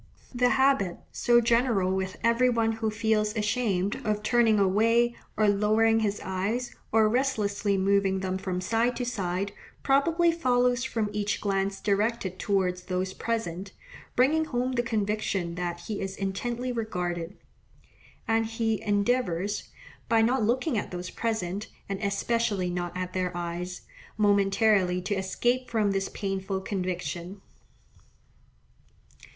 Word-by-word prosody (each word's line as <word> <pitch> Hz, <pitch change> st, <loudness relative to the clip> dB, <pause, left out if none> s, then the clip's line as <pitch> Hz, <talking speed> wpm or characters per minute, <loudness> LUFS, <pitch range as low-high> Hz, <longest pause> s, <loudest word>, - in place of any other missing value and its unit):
The 245 Hz, 0 st, +3 dB
habit, 265 Hz, -10 st, +2 dB
so 240 Hz, 0 st, +4 dB
general 230 Hz, -5 st, +2 dB
with 190 Hz, 0 st, -3 dB
every 235 Hz, +2 st, +4 dB
one 230 Hz, -2 st, +2 dB
who 225 Hz, 0 st, -1 dB
feels 215 Hz, 0 st, 0 dB
ashamed, 210 Hz, -3 st, 0 dB
of 210 Hz, -2 st, -1 dB
turning 230 Hz, -1 st, +4 dB
away, 230 Hz, +5 st, +3 dB, 0.2 s
or 215 Hz, -, +3 dB
lowering 215 Hz, +2 st, +3 dB
his 205 Hz, -2 st, -1 dB
eyes, 200 Hz, +7 st, -2 dB, 0.2 s
or 220 Hz, -1 st, +5 dB
restlessly 210 Hz, -5 st, 0 dB
moving 195 Hz, 0 st, +2 dB
them 190 Hz, 0 st, -2 dB
from 185 Hz, -1 st, -3 dB
side 230 Hz, +5 st, +1 dB
to 245 Hz, -, -2 dB
side, 195 Hz, -4 st, -2 dB, 0.3 s
probably 330 Hz, +5 st, +3 dB
follows 250 Hz, -6 st, +2 dB
from 225 Hz, -5 st, -2 dB
each 205 Hz, 0 st, -1 dB
glance 195 Hz, -1 st, -1 dB
directed 205 Hz, -2 st, 0 dB
towards 185 Hz, -3 st, 0 dB
those 185 Hz, 0 st, -2 dB
present, 195 Hz, -5 st, -3 dB, 0.4 s
bringing 310 Hz, +5 st, +3 dB
home 255 Hz, -3 st, -1 dB
the 245 Hz, -2 st, +1 dB
conviction 210 Hz, -6 st, -1 dB
that 175 Hz, 0 st, -4 dB
he 205 Hz, +3 st, -5 dB
is 195 Hz, 0 st, -4 dB
intently 240 Hz, +6 st, -2 dB
regarded; 180 Hz, -6 st, -3 dB, 0.9 s
and 225 Hz, 0 st, +2 dB
he 225 Hz, -1 st, -1 dB
endeavours, 205 Hz, -2 st, 0 dB, 0.4 s
by 225 Hz, -1 st, +4 dB
not 250 Hz, +3 st, +2 dB
looking 240 Hz, +3 st, +1 dB
at -, -, -5 dB
those 180 Hz, 0 st, -6 dB
present, 210 Hz, -3 st, -2 dB, 0.2 s
and 195 Hz, -1 st, -3 dB
especially 200 Hz, -2 st, 0 dB
not 175 Hz, 0 st, -3 dB
at 185 Hz, 0 st, -4 dB
their 185 Hz, -1 st, -1 dB
eyes, 175 Hz, +1 st, -4 dB, 0.4 s
momentarily 200 Hz, -2 st, +3 dB
to 185 Hz, +3 st, -2 dB
escape 240 Hz, +7 st, 0 dB
from 215 Hz, -3 st, +1 dB
this 195 Hz, 0 st, -1 dB
painful 195 Hz, -1 st, -3 dB
conviction. 185 Hz, -1 st, -4 dB
210 Hz, 135 wpm, -27 LUFS, 190-235 Hz, 0.9 s, or